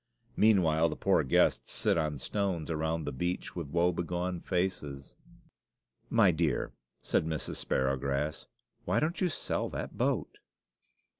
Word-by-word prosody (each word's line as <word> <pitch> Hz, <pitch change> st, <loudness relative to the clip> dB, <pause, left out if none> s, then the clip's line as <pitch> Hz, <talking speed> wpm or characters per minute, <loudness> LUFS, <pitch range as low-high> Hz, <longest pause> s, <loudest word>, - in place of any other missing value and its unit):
Meanwhile 85 Hz, -7 st, +4 dB
the 75 Hz, -, -4 dB
poor -, -, +2 dB
guests 65 Hz, -, +2 dB
sit -, -, +1 dB
on 75 Hz, -3 st, 0 dB
stones 90 Hz, 0 st, -2 dB
around 80 Hz, 0 st, -1 dB
the 75 Hz, -, -2 dB
beach 90 Hz, +7 st, -3 dB
with 85 Hz, -4 st, -4 dB
woe 85 Hz, +3 st, +3 dB
begone 90 Hz, +1 st, -2 dB
faces. 85 Hz, -8 st, -2 dB, 0.9 s
"My 105 Hz, -5 st, +5 dB
dear," 80 Hz, -5 st, 0 dB, 0.3 s
said 80 Hz, -, +1 dB
Mrs. 80 Hz, -2 st, -3 dB
Sparrowgrass, 70 Hz, +3 st, -1 dB, 0.4 s
"why -, -, +1 dB
don't 165 Hz, +3 st, -1 dB
you 185 Hz, -, +3 dB
sell 155 Hz, -, -2 dB
that -, -, -6 dB
boat?" -, -, 0 dB
80 Hz, 135 wpm, -31 LUFS, 75-90 Hz, 0.9 s, My